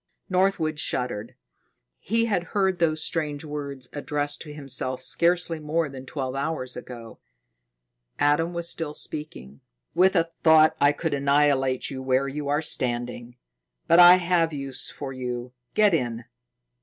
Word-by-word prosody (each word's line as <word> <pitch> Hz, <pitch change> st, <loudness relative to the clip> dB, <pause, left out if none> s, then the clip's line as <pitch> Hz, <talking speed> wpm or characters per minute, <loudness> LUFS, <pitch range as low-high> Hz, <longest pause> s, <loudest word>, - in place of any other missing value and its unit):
Northwood 180 Hz, -5 st, +1 dB
shuddered. 120 Hz, -6 st, -3 dB, 0.6 s
He 230 Hz, +3 st, 0 dB
had 200 Hz, -6 st, 0 dB
heard 190 Hz, -2 st, +1 dB
those 155 Hz, -2 st, +1 dB
strange 150 Hz, -2 st, -2 dB
words 140 Hz, -3 st, -6 dB
addressed 145 Hz, 0 st, -3 dB
to 150 Hz, -, -7 dB
himself 130 Hz, -3 st, -1 dB
scarcely 170 Hz, +4 st, +1 dB
more 155 Hz, +1 st, -1 dB
than 135 Hz, -1 st, -10 dB
twelve 130 Hz, -3 st, -4 dB
hours 135 Hz, -2 st, -3 dB
ago. 115 Hz, -3 st, -10 dB, 1.0 s
Adam 150 Hz, +4 st, +2 dB
was 170 Hz, -1 st, -3 dB
still 160 Hz, -3 st, -3 dB
speaking: 70 Hz, -, -6 dB, 0.3 s
"With 185 Hz, +3 st, +4 dB
a 165 Hz, -, +4 dB
thought 160 Hz, -1 st, +4 dB
I 145 Hz, 0 st, +6 dB
could 155 Hz, +1 st, -3 dB
annihilate 140 Hz, -2 st, +2 dB
you 130 Hz, -1 st, -5 dB
where 130 Hz, +1 st, +1 dB
you 145 Hz, +1 st, -5 dB
are 145 Hz, +2 st, 0 dB
standing. 120 Hz, -3 st, -2 dB, 0.5 s
But 170 Hz, -, +5 dB
I 175 Hz, 0 st, +10 dB
have 175 Hz, -2 st, +1 dB
use 135 Hz, -2 st, -4 dB
for 135 Hz, -2 st, -7 dB
you. 125 Hz, -1 st, -5 dB, 0.2 s
Get 210 Hz, -3 st, +4 dB
in." 120 Hz, -6 st, -1 dB
145 Hz, 145 wpm, -25 LUFS, 130-165 Hz, 1.0 s, I